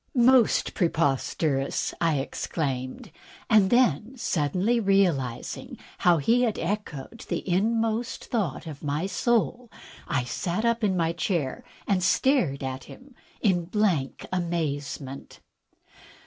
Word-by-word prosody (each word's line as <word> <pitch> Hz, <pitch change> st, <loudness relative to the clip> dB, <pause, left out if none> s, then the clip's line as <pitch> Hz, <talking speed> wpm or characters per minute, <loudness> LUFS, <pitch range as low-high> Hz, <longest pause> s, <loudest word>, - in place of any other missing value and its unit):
"Most 245 Hz, -1 st, +4 dB
preposterous!" 145 Hz, -3 st, 0 dB
I 165 Hz, -3 st, +2 dB
exclaimed, 135 Hz, -1 st, -3 dB, 0.4 s
and 210 Hz, -4 st, +6 dB
then, 240 Hz, -, +2 dB
suddenly 185 Hz, -, +1 dB
realizing 180 Hz, -, 0 dB, 0.2 s
how 175 Hz, -1 st, +4 dB
he 230 Hz, -, +3 dB
had 230 Hz, -4 st, +1 dB
echoed 200 Hz, -, -4 dB
the -, -, -3 dB
inmost 225 Hz, +5 st, 0 dB
thought 200 Hz, -, -2 dB
of 150 Hz, -3 st, -8 dB
my 150 Hz, +4 st, -1 dB
soul, 240 Hz, +3 st, 0 dB, 0.4 s
I 135 Hz, -4 st, 0 dB
sat 175 Hz, -, -2 dB
up 235 Hz, 0 st, +1 dB
in 190 Hz, -3 st, +2 dB
my 165 Hz, -1 st, +1 dB
chair 165 Hz, -8 st, -2 dB, 0.2 s
and 195 Hz, -2 st, +2 dB
stared 185 Hz, -, +2 dB
at 130 Hz, 0 st, -4 dB
him 265 Hz, +1 st, -14 dB, 0.3 s
in 180 Hz, -6 st, +2 dB
blank 180 Hz, -8 st, 0 dB
amazement. 145 Hz, -6 st, -3 dB
180 Hz, 115 wpm, -26 LUFS, 145-225 Hz, 0.4 s, and